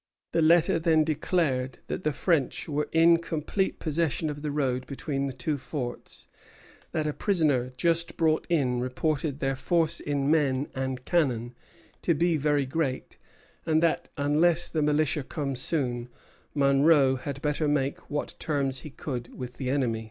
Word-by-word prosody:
The 165 Hz, -, +2 dB
letter 170 Hz, +2 st, +4 dB
then 160 Hz, -1 st, +3 dB
declared 150 Hz, -5 st, 0 dB
that -, -, -4 dB
the 155 Hz, -, +1 dB
French 155 Hz, -3 st, 0 dB
were 150 Hz, -1 st, -1 dB
in 165 Hz, +1 st, +6 dB
complete 170 Hz, +4 st, -2 dB
possession 155 Hz, -1 st, -1 dB
of 145 Hz, 0 st, -8 dB
the 150 Hz, -, -3 dB
road 130 Hz, -3 st, -1 dB
between 140 Hz, 0 st, -3 dB
the -, -, -3 dB
two 130 Hz, +4 st, -2 dB
forts, 130 Hz, -2 st, -6 dB, 0.6 s
that 155 Hz, -, -1 dB
a 150 Hz, -, -1 dB
prisoner 145 Hz, -, +1 dB
just 170 Hz, -1 st, 0 dB
brought 160 Hz, -1 st, +2 dB
in 130 Hz, -7 st, +1 dB
reported 140 Hz, +3 st, -1 dB
their 135 Hz, -3 st, 0 dB
force 165 Hz, +4 st, +1 dB
in 145 Hz, 0 st, 0 dB
men 140 Hz, -3 st, +2 dB
and 130 Hz, -1 st, -3 dB
cannon 125 Hz, -8 st, 0 dB, 0.5 s
to 170 Hz, -, +2 dB
be 170 Hz, +2 st, +2 dB
very 145 Hz, -1 st, +1 dB
great, 135 Hz, -1 st, -3 dB, 0.5 s
and 160 Hz, 0 st, +2 dB
that, 165 Hz, -, +1 dB
unless 160 Hz, +4 st, +2 dB
the 160 Hz, -, -1 dB
militia 150 Hz, 0 st, +2 dB
came 140 Hz, 0 st, -4 dB
soon, 125 Hz, -3 st, -2 dB, 0.5 s
Monro 140 Hz, -1 st, +4 dB
had 140 Hz, +1 st, -5 dB
better 150 Hz, +1 st, 0 dB
make 140 Hz, -1 st, -1 dB
what 145 Hz, 0 st, -3 dB
terms 135 Hz, -4 st, 0 dB
he 150 Hz, -, -9 dB
could 125 Hz, -4 st, -6 dB
with 125 Hz, -1 st, -7 dB
the 130 Hz, -2 st, -3 dB
enemy. 125 Hz, -5 st, 0 dB
145 Hz, 160 wpm, -27 LUFS, 130-160 Hz, 0.6 s, in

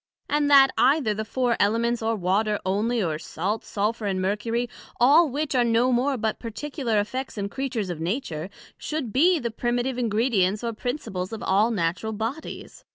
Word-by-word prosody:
and 295 Hz, 0 st, +1 dB
that 275 Hz, -2 st, +7 dB
either 270 Hz, -6 st, +3 dB
the 215 Hz, +1 st, -3 dB
Four 245 Hz, +2 st, 0 dB
Elements, 230 Hz, +3 st, +1 dB
or 225 Hz, 0 st, 0 dB
Water 205 Hz, +3 st, +1 dB
onely, 215 Hz, +4 st, 0 dB
or 155 Hz, -3 st, -2 dB
Salt 195 Hz, +7 st, -3 dB
Sulphur 210 Hz, +1 st, -2 dB
and 190 Hz, -1 st, -1 dB
Mercury, 215 Hz, +5 st, -1 dB, 0.3 s
all 295 Hz, +6 st, +6 dB
which 290 Hz, +3 st, -2 dB
are 250 Hz, -2 st, +3 dB
no 235 Hz, +2 st, +2 dB
more 260 Hz, +3 st, +1 dB
but 220 Hz, -1 st, -2 dB
particular 240 Hz, -1 st, -2 dB
effects 255 Hz, +5 st, -4 dB
and 200 Hz, 0 st, -3 dB
Creatures 245 Hz, -8 st, -3 dB
of 165 Hz, -, -6 dB
Nature, 175 Hz, -, -3 dB, 0.3 s
should 290 Hz, -9 st, -4 dB
be 345 Hz, +6 st, +4 dB
the 235 Hz, -6 st, -3 dB
Primitive 240 Hz, +2 st, -1 dB
Ingredients 215 Hz, -3 st, +1 dB
or 230 Hz, -1 st, -2 dB
Principles 215 Hz, -6 st, -4 dB
of 225 Hz, -, -6 dB
all 205 Hz, +4 st, +3 dB
Natural 190 Hz, +1 st, -1 dB
Bodies? 225 Hz, +9 st, -6 dB
230 Hz, 170 wpm, -25 LUFS, 205-255 Hz, 0.3 s, that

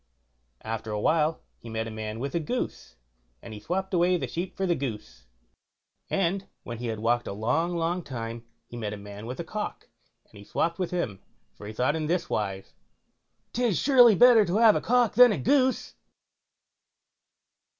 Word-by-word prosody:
After 110 Hz, 0 st, -5 dB
a 105 Hz, -1 st, -2 dB
while 155 Hz, +6 st, +1 dB, 0.2 s
he 115 Hz, -, -11 dB
met 110 Hz, 0 st, -3 dB
a 115 Hz, -, -6 dB
man 110 Hz, 0 st, -5 dB
with 140 Hz, +2 st, -4 dB
a 170 Hz, -, +1 dB
goose, 160 Hz, -, -4 dB, 0.4 s
and 110 Hz, -, -10 dB
he 105 Hz, -, -8 dB
swopped 190 Hz, -, -3 dB
away 180 Hz, +1 st, +3 dB
the -, -, -3 dB
sheep 180 Hz, +2 st, -5 dB
for 195 Hz, -, 0 dB
the 175 Hz, -, +2 dB
goose; 120 Hz, -, -6 dB, 0.8 s
and 195 Hz, +1 st, 0 dB, 0.2 s
when 120 Hz, -1 st, -7 dB
he 120 Hz, -, -4 dB
had 110 Hz, -1 st, -3 dB
walked 120 Hz, +2 st, 0 dB
a -, -, -4 dB
long, 160 Hz, -, 0 dB
long 170 Hz, +2 st, -1 dB
time, 115 Hz, -5 st, -6 dB, 0.2 s
he -, -, -12 dB
met 110 Hz, -3 st, -4 dB
a -, -, -6 dB
man 100 Hz, +2 st, -9 dB
with 125 Hz, +5 st, -6 dB
a -, -, -2 dB
cock, 210 Hz, +4 st, -5 dB, 0.4 s
and -, -, -16 dB
he -, -, -11 dB
swopped 170 Hz, -, -1 dB
with 185 Hz, -, -1 dB
him, 140 Hz, -, -3 dB, 0.3 s
for 105 Hz, -, -10 dB
he 110 Hz, -, -7 dB
thought 130 Hz, +7 st, +1 dB
in 155 Hz, -1 st, -2 dB
this 175 Hz, +1 st, -1 dB
wise, 95 Hz, -2 st, -3 dB, 0.8 s
"'Tis 235 Hz, -6 st, +1 dB
surely 245 Hz, -6 st, +6 dB
better 240 Hz, +1 st, +7 dB
to 190 Hz, +1 st, -1 dB
have 225 Hz, -2 st, +6 dB
a -, -, 0 dB
cock 245 Hz, -1 st, +2 dB
than 245 Hz, +1 st, +7 dB
a -, -, -1 dB
goose." 260 Hz, -1 st, +1 dB
160 Hz, 190 wpm, -27 LUFS, -, 0.8 s, better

